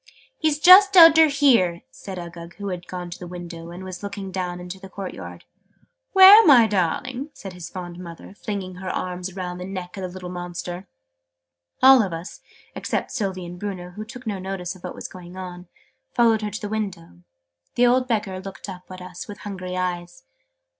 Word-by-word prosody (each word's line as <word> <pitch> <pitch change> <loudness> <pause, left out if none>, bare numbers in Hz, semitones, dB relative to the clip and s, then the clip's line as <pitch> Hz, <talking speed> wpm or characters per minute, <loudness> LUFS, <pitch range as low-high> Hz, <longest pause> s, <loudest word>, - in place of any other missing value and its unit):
"He's 310 -2 +1
just 375 +4 +8
under 325 -2 +9
here," 240 - +3
said 190 -2 -9
Uggug, 170 -1 -9
who 200 -1 -5
had 180 -1 -6
gone 180 -1 -6
to 170 - -8
the 180 - -8
window, 170 -1 -8
and 175 +2 -9
was 185 -1 -8
looking 200 -1 -6
down 180 -1 -3
into 180 +1 -8
the 190 0 -11
court 195 -1 -6
yard. 90 -2 -10 0.7
"Where, 390 +3 +10
my 260 - +7
darling?" 230 - -1
said 195 -2 -9
his 180 -2 -9
fond 175 -2 -8
mother, 170 +1 -10
flinging 195 -3 -6
her 185 0 -6
arms 180 0 -4
round 180 -2 -5
the - - -5
neck 185 -1 -7
of - - -5
the 185 - -4
little 180 0 -8
monster. 175 +1 -6 1.0
All 265 -1 +9
of 190 -5 -2
us 165 +3 -7 0.3
(except - - -3
Sylvie 195 -7 -3
and 175 +1 -9
Bruno, 185 -3 -5
who 210 +4 -7
took 250 +3 -11
no 205 -3 -3
notice 185 -2 -5
of 185 - -17
what - - -6
was - - -7
going 180 0 -12
on) 180 -1 -8 0.5
followed 230 -2 +4
her 210 - -2
to 210 +2 -7
the 210 - -4
window. 195 - -5 0.5
The 245 - +4
old 250 +1 +3
Beggar 210 -5 -1
looked 195 +1 -9
up 185 -2 -9
at 185 0 -9
us 180 -1 -9
with 205 -2 -10
hungry 185 -3 -6
eyes. 175 - -4
185 Hz, 195 wpm, -23 LUFS, 180-210 Hz, 1.0 s, Where